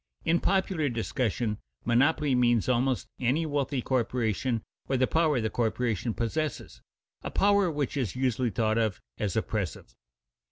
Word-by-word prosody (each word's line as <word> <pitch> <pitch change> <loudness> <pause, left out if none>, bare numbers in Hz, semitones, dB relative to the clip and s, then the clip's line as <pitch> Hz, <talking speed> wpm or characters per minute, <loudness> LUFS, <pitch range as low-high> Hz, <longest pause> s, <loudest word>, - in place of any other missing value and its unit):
_ - - -9
In 170 +1 +4
popular 190 -6 +1
discussion 115 -2 -1 0.3
monopoly 140 +4 +3
means 120 -3 +3
almost 130 0 +1
any 135 +6 +1
wealthy 140 -3 -1
corporation 120 -2 0 0.2
or 135 - +1
the 130 - +3
power 155 -2 +2
the 110 -1 -1
corporation 115 -2 -1
possesses, 145 +5 -3 0.4
a - - -4
power 200 -2 +3
which 145 -4 -2
is 125 -8 -2
usually 125 -1 +1
thought 110 0 +1
of 110 -4 0 0.2
as 105 -1 -1
oppressive. 100 - -3
125 Hz, 145 wpm, -28 LUFS, 115-145 Hz, 0.4 s, In